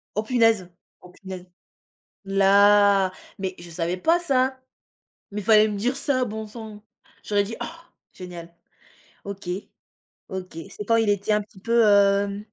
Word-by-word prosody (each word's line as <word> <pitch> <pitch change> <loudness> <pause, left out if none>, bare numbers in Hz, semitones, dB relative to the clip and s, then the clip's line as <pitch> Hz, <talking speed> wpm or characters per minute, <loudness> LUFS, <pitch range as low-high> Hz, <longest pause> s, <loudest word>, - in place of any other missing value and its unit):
Oh 215 - 0
punaise! 225 -6 +2 0.3
Oh 180 - -15
punaise. 185 -1 -9 0.8
Là, 200 0 +4 0.3
mais, 190 -1 -3
je 175 - -11
savais 170 +1 -3
pas 330 - +2
ça. 260 -5 0 0.7
Mais 210 +1 -4
il - - -12
fallait 215 0 +6
me 205 - -4
dire 245 +6 -1
ça, 260 -2 0
bon 220 -1 -6
sang! 215 -1 -10 0.4
J'aurais 205 -1 +1
dit: 225 +3 -6
«Ah 330 +1 -7 0.3
génial!» 175 -2 -10 0.7
OK, 200 -2 -8 0.8
OK. 185 -4 -7
C'est 210 - -7
quand 230 +2 +2
il 225 -2 +2
était 205 +1 0
un 210 - +3
petit 205 -2 -18
peu, 230 +1 +3
hem? 200 -1 +3
205 Hz, 155 wpm, -24 LUFS, 190-225 Hz, 0.8 s, fallait